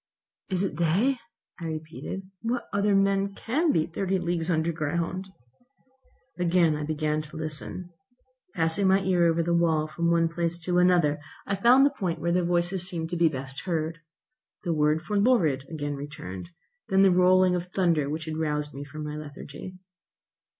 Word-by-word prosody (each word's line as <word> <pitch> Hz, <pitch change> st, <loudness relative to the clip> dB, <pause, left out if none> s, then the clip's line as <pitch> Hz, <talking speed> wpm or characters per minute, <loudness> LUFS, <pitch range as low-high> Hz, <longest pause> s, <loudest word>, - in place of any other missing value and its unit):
"It 190 Hz, -, -1 dB
is 195 Hz, -, -1 dB
they," 185 Hz, -, +1 dB, 0.4 s
I 170 Hz, -, -6 dB
repeated. 160 Hz, +4 st, -5 dB, 0.2 s
"What 240 Hz, +2 st, -2 dB
other 200 Hz, 0 st, +2 dB
men 195 Hz, 0 st, +2 dB
can 300 Hz, +8 st, +1 dB
be 160 Hz, -, +2 dB
thirty 190 Hz, +3 st, -1 dB
leagues 170 Hz, -1 st, -1 dB
under 165 Hz, 0 st, +1 dB
ground?" 170 Hz, +4 st, -2 dB, 1.1 s
I -, -, -2 dB
again 170 Hz, -4 st, +3 dB
began 155 Hz, 0 st, 0 dB
to 155 Hz, +1 st, -11 dB
listen. 155 Hz, +3 st, -5 dB, 0.6 s
Passing 165 Hz, +3 st, +1 dB
my 190 Hz, +1 st, +4 dB
ear 180 Hz, -2 st, +3 dB
over 165 Hz, 0 st, +2 dB
the 170 Hz, +1 st, 0 dB
wall 165 Hz, -2 st, +2 dB
from 170 Hz, +2 st, -1 dB
one 170 Hz, -1 st, +3 dB
place 170 Hz, 0 st, -1 dB
to 180 Hz, +1 st, +1 dB
another, 175 Hz, -5 st, +3 dB, 0.3 s
I 200 Hz, -, -1 dB
found 245 Hz, +7 st, +6 dB
the 285 Hz, -, +3 dB
point 180 Hz, -10 st, -2 dB
where 170 Hz, +2 st, -1 dB
the 180 Hz, +1 st, +2 dB
voices 175 Hz, +1 st, 0 dB
seemed 165 Hz, -2 st, -4 dB
to -, -, -1 dB
be 170 Hz, -1 st, +4 dB
best 135 Hz, 0 st, -6 dB
heard. 165 Hz, -2 st, -2 dB, 0.6 s
The 175 Hz, -3 st, 0 dB
word 150 Hz, +1 st, +2 dB
'forlorad' 200 Hz, -, +2 dB
again 145 Hz, -2 st, -3 dB
returned; 140 Hz, -, -7 dB, 0.4 s
then 195 Hz, -1 st, +5 dB
the 195 Hz, -, +6 dB
rolling 185 Hz, 0 st, +5 dB
of 180 Hz, 0 st, -2 dB
thunder 170 Hz, -6 st, +1 dB
which 155 Hz, +1 st, -4 dB
had 155 Hz, -1 st, -4 dB
roused 150 Hz, -1 st, -1 dB
me 140 Hz, -, -6 dB
from 150 Hz, +2 st, -8 dB
my 150 Hz, 0 st, -5 dB
lethargy. 150 Hz, +3 st, -8 dB
170 Hz, 170 wpm, -27 LUFS, 155-185 Hz, 1.1 s, found